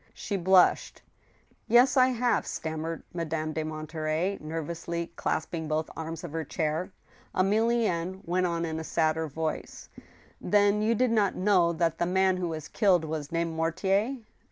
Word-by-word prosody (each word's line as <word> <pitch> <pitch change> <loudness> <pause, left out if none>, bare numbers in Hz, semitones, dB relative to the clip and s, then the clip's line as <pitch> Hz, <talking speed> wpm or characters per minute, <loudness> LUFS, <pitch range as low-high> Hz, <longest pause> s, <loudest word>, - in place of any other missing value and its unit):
She 205 - -4
blushed. 185 0 +3 0.6
"Yes, 245 +4 +5
I 255 -1 +6
have," 245 -1 +1
stammered 160 +1 -4
Madame 160 -2 -3
de 155 - -2
Monterey, 155 +4 -2
nervoudy 165 +2 -4
clasping 160 0 -2
both 155 +1 -1
arms 160 +1 -6
of 170 - -6
her 160 +1 -3
chair, 160 +4 -2 0.4
Emilienne 195 -3 +1
went 180 +1 +1
on 170 -1 -1
in 160 -1 -3
a - - -5
sadder 160 0 0
voice: 155 +2 -5 0.3
" - - -26 0.2
Then 205 +2 +3
you 225 +2 +2
did 250 +1 +2
not 210 -4 +2
know 185 -3 +3
that 165 -1 0
the 170 - +1
man 190 0 +2
who 180 -1 -2
was 155 -2 -5
killed 180 -4 +2
was 155 -2 -4
named 165 0 -1
Mortier 190 +9 0
170 Hz, 155 wpm, -28 LUFS, 160-195 Hz, 0.6 s, I